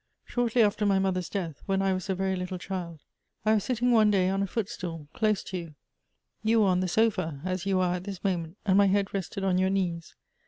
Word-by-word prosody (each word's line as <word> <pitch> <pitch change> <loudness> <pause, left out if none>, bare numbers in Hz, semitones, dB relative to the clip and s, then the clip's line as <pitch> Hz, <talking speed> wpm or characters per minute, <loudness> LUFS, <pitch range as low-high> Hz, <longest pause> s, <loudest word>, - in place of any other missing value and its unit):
Shortly 240 -1 +2
after 210 0 +1
my 200 -2 +3
mother's 185 -2 0
death, 170 -7 -4
when 195 -1 +1
I 195 -1 +2
was 185 +2 -4
a 190 - +1
veiy 190 0 0
little 180 0 -4
child, 175 -4 -6 0.4
I 215 - +4
was 210 -3 +2
sitting 245 0 +1
one 220 -3 +5
day 190 -3 +3
on 195 +1 0
a 200 - 0
footstool 180 -7 -4
close 215 -2 +1
to 185 - -5
you. 165 -3 -9 0.7
You 220 0 +3
were 200 - +4
on 180 -1 +2
the 185 - 0
sofa, 180 -7 +1
as 185 0 -2
you 190 -1 +2
are 180 -1 +1
at 180 - -9
this 195 -3 -7
moment, 175 -2 -2
and 195 -1 +4
my 200 - +6
head 200 0 +1
rested 195 0 -3
on 185 -1 +2
your 190 0 +2
knees. 175 -4 -2
190 Hz, 235 wpm, -28 LUFS, 180-205 Hz, 0.7 s, my